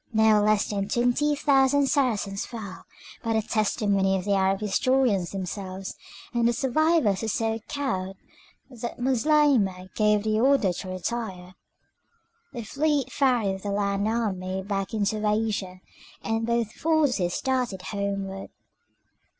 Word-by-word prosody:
No 220 -1 +5
less 210 0 +2
than 200 -1 -3
twenty 245 +6 +2
thousand 280 0 +3
Saracens 220 -8 0
fell, 220 -6 -8 0.4
by 230 -1 0
the 220 - +2
testimony 200 -3 +1
of 185 - -5
the 200 - +1
Arab 195 0 +2
historians 215 -3 +1
themselves, 190 0 -5 0.4
and 235 -1 +2
the 240 - +2
survivors 270 - +2
were 225 - -2
so 225 +1 -1
cowed 195 -10 -3 0.5
that 235 -1 -6
Moslemah 250 -8 +2
gave 210 -1 +2
the 215 0 +1
order 250 -7 +3
to 185 +1 -7
retire. 185 -1 -4 1.0
The 235 - -6
fleet 290 +4 0
ferried 230 -9 +1
the 205 - -4
land 200 0 0
army 190 -5 -2
back 195 +1 -3
into 210 0 -1
Asia, 210 -4 -1 0.4
and 225 +2 -1
both 235 -2 0
forces 285 - +1
started 250 -8 -1
homeward. 195 -1 -4
215 Hz, 130 wpm, -26 LUFS, 195-245 Hz, 1.0 s, No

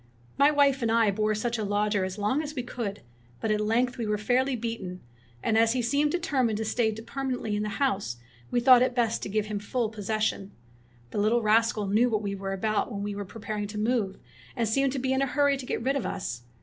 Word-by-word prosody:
'' - - -29
My 285 +1 +7
wife 280 -2 +3
and 230 -1 +1
I 225 -2 +4
bore 215 +2 0
such 235 +2 -2
a - - -1
lodger 205 0 +1
as 185 +1 -4
long 210 +8 +1
as 305 -1 -6
we 250 - -2
could, 230 - -5 0.4
but 220 - -1
at 210 0 +1
length 240 +4 +1
we 225 - -2
were 210 0 +1
fairly 255 +5 +1
beaten; 215 -6 -5 0.4
and 220 0 +3
as 225 0 +4
he 250 -1 0
seemed 285 +5 +2
determined 265 -10 0
to 220 - -2
stay 220 0 +1
permanently 240 0 -3
in 210 - -1
the 210 - -2
house 200 - 0 0.3
we - - +1
thought 250 0 +7
it 255 -1 +1
best 230 -3 +1
to - - -4
give 215 +1 0
him 210 -1 -3
full 225 +2 -1
possession. 215 -2 -2 0.6
The - - -2
little 220 +3 +2
rascal 220 0 +3
knew 215 +5 +3
what 215 -2 -1
we 200 -1 -2
were 195 0 -4
about 215 +4 -1
when 200 -2 -4
we 205 0 -3
were 200 0 -5
pre 225 +4 -11
paring 210 0 -3
to 210 +1 -7
move, 215 -3 0 0.4
and 235 -3 0
seemed 275 +5 +2
to - - -2
be 265 0 0
in 265 - +1
a 275 - +2
hurry 285 +1 +2
to 265 -2 -7
get - - -2
rid 270 +3 +1
of 275 - -1
us. 120 -9 -4
225 Hz, 245 wpm, -27 LUFS, 210-250 Hz, 0.6 s, My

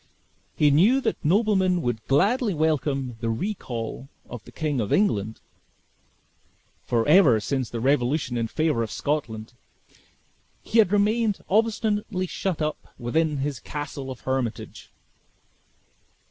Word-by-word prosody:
He 150 -1 +4
knew 200 - +5
that - - -2
nobleman 190 0 +2
would 120 -3 -2
gladly 205 - +2
welcome 145 -5 -1
the 115 - -2
recall 125 - -4 0.2
of 120 -3 -9
the - - -13
King 150 -5 -2
of 105 - -3
England; 110 - +1 1.4
for 115 0 0
ever 150 - +6
since 130 +1 -2
the 115 - -4
revolution 135 +1 +1
in 115 -1 -1
favor 155 -1 0
of 115 - -2
Scotland, 120 -6 -3 1.1
he 230 - +1
had 210 -4 +5
remained 210 +1 +1
obstinately 210 -2 0
shut 180 -3 -3
up 150 0 -5
within 150 +5 0
his 145 -5 -3
castle 145 -2 -6
of 130 - -8
Hermitage. 130 -4 -4
150 Hz, 125 wpm, -25 LUFS, 120-190 Hz, 1.4 s, ever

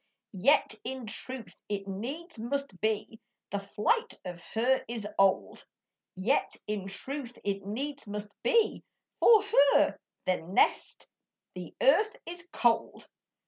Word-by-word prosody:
Yet 265 +10 +4
in 260 0 -5
truth 225 -2 -5
it 200 -1 -3
needs 260 - -5
must 250 -4 -3
be 215 +1 -1 0.3
The 200 - -1
flight 330 - 0
of 175 -1 -6
her 255 +4 +3
is 230 -3 -4
old; 195 -1 +2 0.5
Yet 215 +10 +1
in 210 -2 -3
truth 250 +5 -4
it 200 -1 -2
needs 275 +4 -4
must 205 0 -5
be, 470 -3 +2 0.4
For 445 -3 +7 0.3
her - - +3 0.3
nest, 180 0 +1 0.5
the 180 -3 -8
earth, 420 +11 +4
is 350 +1 -8
cold. 235 -2 +1
225 Hz, 120 wpm, -30 LUFS, 200-280 Hz, 0.5 s, For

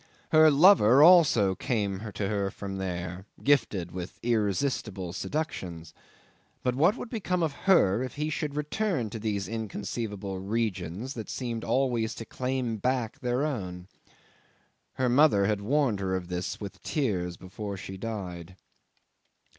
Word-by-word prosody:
Her 155 0 +7
lover 145 - +7
also 155 - +6
came 105 -2 -2
to 100 - -1
her 100 -1 0
from 95 0 -6
there, 90 0 -4 0.2
gifted 105 -11 +2
with 90 -1 -7
irresistible 105 -4 -1
seductions; 90 - -4 0.7
but 125 - +1
what 165 - +3
would 245 - -7
become 180 -6 -1
of 160 - +1 0.2
her 110 - +5
if 130 -1 -4
he 150 +1 -2
should 150 -1 -3
return 150 - -1
to 115 - -5
these 105 -2 -2
inconceivable 105 -2 -4
regions 105 - -2
that 110 -5 -7
seemed 120 -3 -4
always 120 -4 0
to 115 - -7
claim 125 -2 -2
back 125 0 -1
their 125 +3 0
own? 90 -11 -4 1.1
Her 130 - 0
mother 125 -5 +5
had 105 0 0
warned 130 -1 +1
her 95 -1 -1
of 90 -1 -4
this 90 0 -3
with 100 -2 -8
tears, 90 - -1
before 100 +2 -6
she 95 +1 -7
died 95 -4 -6
110 Hz, 140 wpm, -28 LUFS, 95-135 Hz, 1.1 s, Her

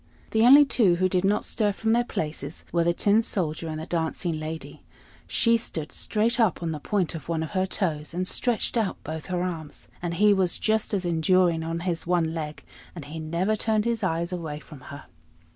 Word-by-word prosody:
The 220 - +2
only 285 +3 +9
two 215 -10 +3
who 185 +2 +2
did 185 0 0
not 200 +2 +1
stir 210 -2 +1
from 220 +3 0
their 240 +1 +3
places 155 - -5
were 170 -1 +2
the 170 - +3
Tin 205 +5 +3
Soldier 165 -7 -2
and 155 -1 -4
the 160 - -5
Dancing 165 -1 -2
Lady: 160 +1 -7 0.5
she 230 0 +3
stood 160 -9 -5
straight 225 +3 0
up 215 -6 +2
on 165 - -1
the 155 - -4
point 190 +2 -1
of 165 -1 -8
one 160 -1 0
of 160 - -6
her 185 0 0
toes, 160 -7 -2
and 180 +2 -2
stretched 240 +2 0
out 215 -5 0
both 155 0 -6
her 180 -1 -1
arms; 160 -5 -6
and 170 -1 -3
he 210 +3 +5
was 190 -3 +2
just 220 -1 0
as 190 -2 -2
enduring 170 0 +2
on 165 +1 -3
his 170 -2 -2
one 170 -2 +1
leg; 155 -2 -5 0.3
and 165 -5 -7
he 155 +3 -7
never 170 +7 0
turned 215 0 0
his 235 -1 0
eyes 170 -1 -1
away 160 -4 -4
from 150 -3 -13
her. 140 -1 -9
175 Hz, 210 wpm, -26 LUFS, 160-205 Hz, 0.5 s, only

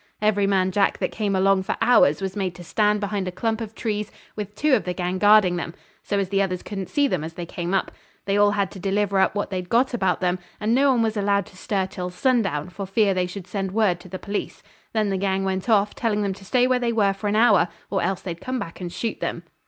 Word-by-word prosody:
Every 205 -2 +2
man 190 -1 +2
Jack 200 0 +2
that - - -2
came 205 -3 -1
along 190 0 +3
for 190 - -3
hours 225 -9 +4
was 190 -1 -3
made 190 -3 -2
to 175 - -10
stand 210 +4 +1
behind 205 -2 -2
a - - -2
clump 225 +4 -2
of 225 0 -6
trees 210 -2 -3 0.2
with 205 -1 -6
two 300 +5 +2
of 240 - +3
the 180 -1 -3
gang 180 +1 -2
guarding 205 -3 +5
them, 170 0 -5 0.3
so 205 - -2
as 195 -2 -1
the 200 0 +2
others 185 -2 -2
couldn't 195 -3 -5
see 285 -1 +2
them 180 - -1
as 160 +1 -6
they 175 - -5
came 175 +1 -4
up. 195 - 0 0.3
They 195 0 0
all 205 0 +5
had 200 -2 0
to 195 - -9
deliver 200 +1 +1
up 190 - +2
what 205 - -2
they'd 180 -2 -4
got 250 +3 +2
about 190 -5 0
'em, 180 0 +1 0.2
and 215 +2 +1
no 275 +3 +4
one 245 -3 +3
was 220 -1 -1
allowed 200 -1 +1
to - - -17
stir 190 0 -1
till 180 -1 -5
sundown, 185 - 0
for 195 +1 -6
fear 200 0 +2
they 180 -1 0
should 180 0 -8
send 195 -1 -3
word 205 -5 +2
to 185 - -13
the 185 - -5
police. 200 +2 -5 0.3
Then 215 -3 0
the 195 - 0
gang 195 0 0
went 190 +3 -2
off, 205 -2 +3
telling 210 -3 0
them 200 -1 -1
to 195 +1 -14
stay 250 +5 +3
where 255 0 +2
they 240 -1 0
were 205 -4 +2
for 200 +2 -5
an 205 - +1
hour 215 -6 +5 0.2
or 195 - +1
else 190 -1 -1
they'd 170 -3 -6
come 255 0 -3
back 170 -6 -6
and 175 -1 -4
shoot 225 +5 -3
them. - - -3
200 Hz, 265 wpm, -23 LUFS, 185-215 Hz, 0.3 s, guarding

